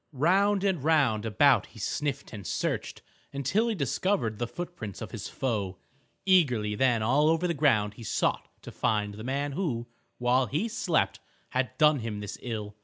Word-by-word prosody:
Round 190 +8 +3
and 190 -8 0
round 135 -9 +2
about 135 +5 +4
he - - -17
sniffed 140 +6 -3
and 100 -4 -7
searched - - -2 0.3
until 140 - 0
he 230 - 0
discovered 140 - 0
the 120 - -1
footprints 120 - -7
of - - -7
his - - -6
foe. 100 -8 -2 0.5
Eagerly 125 - +3
then 120 0 +2
all 140 +7 +3
over 165 +2 +2
the 170 - 0
ground 115 -9 +2
he 115 - -11
sought - - 0 0.2
to - - -8
find 105 -2 0
the 110 +2 -8
man 140 +3 -1
who, 135 -8 -2 0.3
while 125 +1 +2
he 155 - -1
slept, 195 -7 0 0.3
had 130 0 -2
done 150 -2 +5
him 110 -3 -4
this 105 0 -6
ill. 105 -4 -5
130 Hz, 175 wpm, -28 LUFS, 110-160 Hz, 0.5 s, done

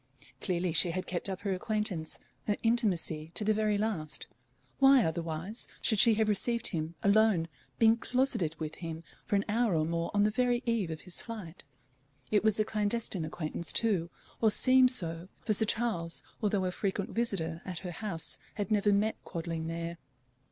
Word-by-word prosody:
Clearly 180 -2 -1
she 175 - +6
had 185 +2 -3
kept 180 +2 -1
up 190 0 -4
her 200 -2 -1
acquaintance, 185 -4 -2 0.3
her 210 - +2
intimacy 185 -9 0
to - - +1
the 215 +1 +3
very 215 -1 +1
last: 200 -8 -2 0.5
why 270 -2 +6
otherwise 165 +5 -3
should 215 -3 +3
she 225 +1 +6
have 220 0 +1
received 235 +3 +1
him, 165 -2 -4
alone, 200 -4 +4 0.3
been 225 0 +5
closeted 240 - 0
with 155 -1 -4
him 165 -1 -6 0.2
for - - 0
an 200 - +1
hour 220 -2 +1
or 155 -1 +2
more 170 +1 -2
on 205 - +4
the 210 - +3
very 245 +2 +1
eve 230 -7 0
of 160 -1 -5
his 180 - -5
flight? 195 -7 -8 0.7
It 210 -1 +3
was 220 -1 +3
a 215 - +3
clandestine 210 -4 -1
acquaintance 160 +1 -1
too, 195 -7 +2 0.3
or 220 - +5
seemed 255 +3 +5
so, 170 -7 +1 0.2
for 215 - +2
Sir 220 +2 +6
Charles, 205 -8 -1 0.2
although 205 -3 +1
a 180 - -1
frequent 195 +1 -2
visitor 170 -8 -1
at 185 -2 -6
her 180 - -3
house, 175 -3 -3 0.2
had 205 +1 -3
never 205 -1 +3
met 210 +2 0
Quadling 165 -1 -4
there. 170 0 -5
200 Hz, 180 wpm, -31 LUFS, 170-220 Hz, 0.7 s, she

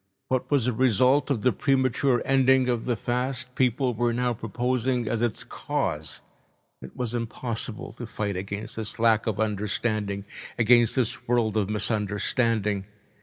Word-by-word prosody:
What 130 -1 0
was 140 -5 +2
a 125 - +1
result 130 +4 +3
of 125 -7 0
the 125 - +4
premature 130 -1 +1
ending 130 -1 +4
of 120 -2 0
the 120 - +1
fast 125 +1 -2
people 125 0 +1
were 120 +1 +1
now 125 0 0
proposing 125 +1 -1
as 110 +1 -1
its 120 -2 -1
cause! 80 +1 -3 0.6
It 65 - -11
was 120 -2 -2
impossible 115 -1 -4
to 120 0 -7
fight 105 -3 -3
against 100 +4 -5
this 110 -1 -3
lack 115 -1 +3
of 105 -3 -1
understanding, 105 -1 -1 0.3
against 120 0 +4
this 125 -4 -1
world 115 -3 +1
of 105 -2 +1
misunderstanding. 105 -1 0
115 Hz, 150 wpm, -26 LUFS, 105-125 Hz, 0.6 s, the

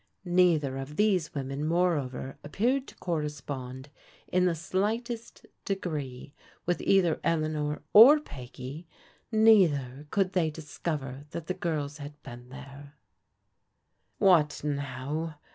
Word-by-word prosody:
Neither 170 -7 +3
of 135 +2 -6
these 190 -7 +1
women 135 +1 -3
moreover 155 -6 0
appeared 245 - 0
to - - -12
correspond 145 -5 -4 0.4
in 180 0 +2
the 175 -2 +2
slightest 225 +7 -3 0.2
degree 150 -9 -4 0.3
with 175 0 0
either 180 -5 +3
Eleanor 155 -2 -1
or 265 +8 +10
Peggy, 135 - -9 0.4
neither 160 - +4
could 195 +1 0
they 170 -4 +2
discover 150 -3 -5
that 165 0 -6
the 185 - -2
prls 150 -5 -3
had 145 +1 -9
been 120 +1 -10
there, 140 +2 -11 1.2
"What 165 -8 +4
now?" 145 +2 -3
150 Hz, 110 wpm, -28 LUFS, 140-180 Hz, 1.2 s, or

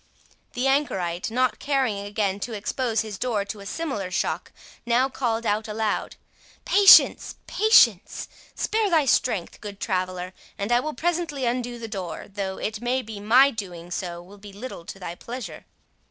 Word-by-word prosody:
The 250 +2 -1
anchorite, 190 - 0
not 250 +1 +1
caring 265 -7 0
again 200 -1 -2
to 230 +3 -5
expose 225 +2 -1
his 215 -3 -7
door 220 -5 -1
to 210 +1 -7
a 200 - -9
similar 265 - -3
shock, - - -2 0.3
now 245 +3 +2
called 235 -3 -2
out 215 +1 0
aloud, 215 0 -2 0.5
"Patience, 400 -1 +7
patience—spare 425 - +2
thy 320 -5 +3
strength, 230 -8 0
good 205 -1 -8
traveller, 185 -2 -2 0.2
and 200 +3 -3
I 240 - +5
will 305 +2 -4
presently 325 -2 -1
undo 240 0 -2
the 230 -1 -6
door, 190 -6 -5
though, 195 -1 -4
it 215 0 -4
may 250 +2 0
be, 220 -2 -8
my 250 +7 +5
doing 180 -6 -7
so 175 -1 -4
will 200 +3 -15
be 205 0 -11
little 200 -4 -8
to 195 - -8
thy 180 -3 -6
pleasure." 225 -3 -8
220 Hz, 160 wpm, -25 LUFS, 195-255 Hz, 0.5 s, Patience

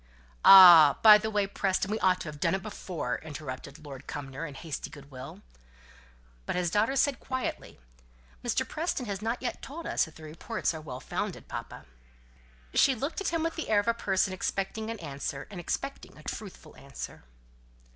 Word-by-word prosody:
"Ah! 175 -7 +10
by 215 -1 +10
the 220 +1 -3
way, 205 -2 +1
Preston, 195 0 -1
we 215 - -1
ought 185 -1 +2
to - - -6
have 150 -1 -8
done 165 +4 +1
it 190 - -5
before," 180 - -4
interrupted 145 -2 -8
Lord 135 -3 -10
Cumnor, 145 +3 -6
in 145 - -10
hasty 160 0 -6
goodwill. 135 -2 -11 1.0
But - - -2
his 180 -2 0
daughter 220 +7 +2
said 275 -2 +2
quietly, 260 - -5 0.6
"Mr. - - 0
Preston 310 -5 -2
has 200 -2 -4
not 230 +4 -2
yet 245 - -3
told 325 +5 -8
us - - +1
if 160 - -16
the 160 - -13
reports 155 +2 -3
are 160 - -7
well 130 -4 -8
founded, - - -4
papa." - - -7 0.9
She 265 - +4
looked 280 - -3
at 395 - -2
him 330 -1 0
with 330 0 -2
the 320 - -5
air 210 -2 +4
of 205 - -3
a 230 - +4
person 195 -4 0
expecting 195 +4 -3
an 230 - -4
answer, 140 -2 -5
and 190 - -7
expecting 275 - -5
a 155 - -14
truthful 185 -6 -8
answer. 140 0 -9
190 Hz, 185 wpm, -29 LUFS, 150-220 Hz, 1.0 s, Ah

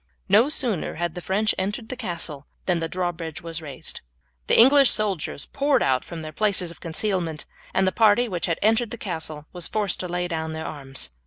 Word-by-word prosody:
No 215 +8 +5
sooner 245 - +1
had 175 0 -2
the 180 - -6
French 210 +4 +1
entered 205 +4 -3
the - - -3
castle 170 - -4 0.2
than 180 -2 +2
the 165 0 -2
drawbridge 170 -4 -3
was 165 0 -4
raised. 140 -4 -5 0.5
The - - +4
English 270 +3 +8
soldiers 190 -9 0
poured 280 -2 +1
out 130 -1 +2
from 165 -2 -7
their 155 - -5
places 185 -1 +1
of 170 - -14
concealment, 170 -2 -1 0.3
and - - +2
the 190 - +2
party 225 +3 +4
which 180 -6 -2
had 170 - 0
entered 225 +2 +3
the 240 - -6
castle 160 -7 -5
were 180 - -7
forced 205 +2 0
to 180 - -3
lay 175 0 -2
down 160 -2 -3
their 160 0 -5
arms. 135 - -4
180 Hz, 200 wpm, -24 LUFS, 160-215 Hz, 0.5 s, English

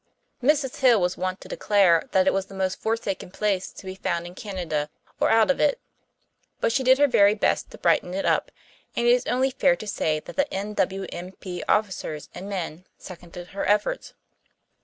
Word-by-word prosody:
Mrs. 275 0 +2
Hill 250 -5 +5
was 180 0 0
wont 185 +1 -3
to - - -11
declare 190 -6 +3
that 190 -1 +3
it - - +3
was 195 0 -1
the 195 - -11
most 190 -1 -2
forsaken 220 -5 -2
place 195 -1 -1
to - - -13
be 185 - -5
found 175 -2 -2
in 175 - -9
Canada 175 -7 -3 0.3
or - - +3
out 225 +3 +5
of - - -2
it; 290 -2 +2 0.8
but - - +1
she 265 - +1
did 260 +1 +6
her 290 +1 +5
very 205 -5 +5
best 210 - 0
to - - -12
brighten 180 - +1
it 195 - -2
up, - - +1 0.5
and 235 - 0
it 240 - +6
is 245 0 +2
only 260 +2 +1
fair 265 0 +3
to 215 - -9
say 155 -6 0
that - - -11
the 285 0 +1
N.W.M.P., 190 -2 -4
officers 190 -7 -1
and 190 +3 -7
men, 180 -3 -5
seconded 175 -1 -10
her 200 - -4
efforts. 210 - 0
195 Hz, 195 wpm, -25 LUFS, 180-230 Hz, 0.8 s, did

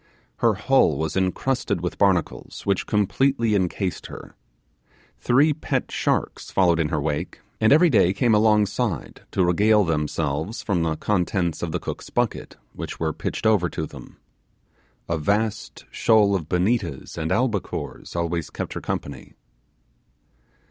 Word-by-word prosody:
Her 115 -3 +2
hull 105 - +3
was 80 +1 -2
encrusted 95 +2 0
with 90 - -4
barnacles, 95 -5 0
which 100 -2 0
completely 115 +3 +1
encased 95 -1 -1
her. - - -11 0.9
Three 145 +5 +3
pet 155 - -3
sharks - - -1
followed 85 -3 +3
in 80 -2 +1
her 75 - -1
wake, 75 0 -3 0.2
and 110 - +3
every 160 +3 +6
day 95 -6 +4
came 110 +4 +2
alongside 105 -1 +1
to 95 - +1
regale 105 +4 +4
themselves 80 - -2
from 95 -5 0
the 80 -1 0
contents 90 -2 -1
of 85 - -3
the - - -2
cook's - - -7
bucket, 120 -3 -2 0.2
which - - -7
were 80 -1 -1
pitched - - -4
over 105 -6 +3
to 80 - -4
them. - - -12 0.9
A 85 -1 -1
vast 105 +6 -1
shoal 110 -3 +3
of 80 -5 -4
bonetas 90 - -1
and 80 -1 -3
albicores 115 -8 -2
always 85 -2 -2
kept - - -5
her - - -5
company. 70 -3 -5
95 Hz, 140 wpm, -23 LUFS, 85-110 Hz, 0.9 s, every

